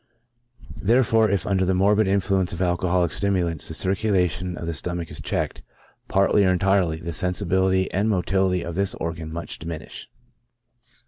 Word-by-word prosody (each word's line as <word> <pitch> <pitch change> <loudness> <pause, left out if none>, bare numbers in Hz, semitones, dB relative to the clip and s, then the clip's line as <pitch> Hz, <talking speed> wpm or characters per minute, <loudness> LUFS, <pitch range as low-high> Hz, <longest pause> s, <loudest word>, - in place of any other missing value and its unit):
Therefore, 115 0 +3
if 100 -1 0
under 95 -2 +1
the 95 0 +1
morbid 100 +2 +3
influence 95 -1 +1
of - - -5
alco 90 0 0
holic 90 -2 +1
stimulants 90 -5 -1
the - - -4
circulation 90 -3 0
of - - -6
the 85 - -3
stomach 85 0 -4
is 75 -1 -6
checked, - - -2 0.5
partly 100 +1 +3
or 95 - +3
entirely, 95 -3 +1
the 85 +1 -6
sensibility 95 +1 +2
and 100 +4 0
motility 95 -2 +1
of 85 - -5
this 100 +2 +1
organ 80 -1 -5
much 85 +1 -4
diminish. 80 -1 -7
95 Hz, 155 wpm, -23 LUFS, 85-100 Hz, 0.5 s, Therefore